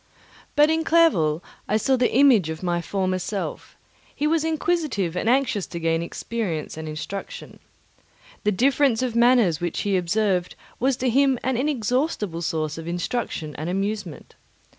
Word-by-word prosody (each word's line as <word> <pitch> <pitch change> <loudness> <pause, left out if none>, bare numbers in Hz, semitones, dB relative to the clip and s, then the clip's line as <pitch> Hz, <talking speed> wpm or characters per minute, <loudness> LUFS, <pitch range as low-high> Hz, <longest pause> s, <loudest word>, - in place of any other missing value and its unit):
But 295 +1 +5
in 320 0 +1
Clerval 190 - +3 0.2
I 210 - +2
saw 265 +4 +2
the 250 -1 +1
image 245 - +5
of 160 +2 -6
my 175 -1 0
former 185 +1 -1
self; 195 +2 -5 0.4
he 295 - -1
was 315 0 +2
inquisitive 310 - -1
and 220 - 0
anxious 255 -6 +1
to 170 - -6
gain 165 0 0
experience 170 -2 -4
and 160 0 -6
instruction. 200 - -7 0.8
The 210 - +2
difference 260 +3 +2
of 245 -3 -2
manners 235 -9 +4
which 175 -1 -2
he 200 -1 0
observed 185 0 0 0.2
was 260 +1 +1
to 255 - 0
him 270 +1 +3
an 260 0 0
inexhaustible 245 - -1
source 155 -1 -2
of 165 - -8
instruction 175 -3 -3
and 155 +3 -4
amusement. 195 -3 -4
210 Hz, 155 wpm, -24 LUFS, 170-265 Hz, 0.8 s, But